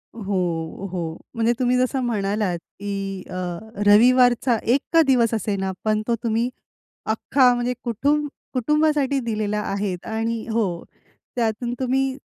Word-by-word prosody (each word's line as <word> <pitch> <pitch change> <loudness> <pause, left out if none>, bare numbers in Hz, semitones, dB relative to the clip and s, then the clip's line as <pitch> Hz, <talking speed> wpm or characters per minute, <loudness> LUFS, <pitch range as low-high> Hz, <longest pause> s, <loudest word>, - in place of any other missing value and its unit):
हो, 185 -4 -2
हो. 165 -3 -4 0.2
म्हणजे 230 +1 +2
तुम्ही 250 0 +2
जसं 255 +2 +1
म्हणालात, 205 -5 0 0.2
की 195 -1 -4
अ, - - -8 0.5
रविवारचा 245 +3 +5 0.2
1 275 - +2
का 330 - +7
दिवस 240 -4 +3
असेना, 200 -3 -1
पण 215 -1 +1
तो 235 - +2
तुम्ही 230 +1 +1 0.6
अख्खा 250 +3 +3
म्हणजे 245 +1 -1
कुटुंबासाठी 285 +2 0
दिलेला 215 -2 -1
आहे. 200 -2 -2
आणि 225 0 -2
हो, 200 -7 -1 0.5
त्यातून 235 0 -1
तुम्ही 265 +1 0
230 Hz, 120 wpm, -23 LUFS, 200-255 Hz, 0.6 s, का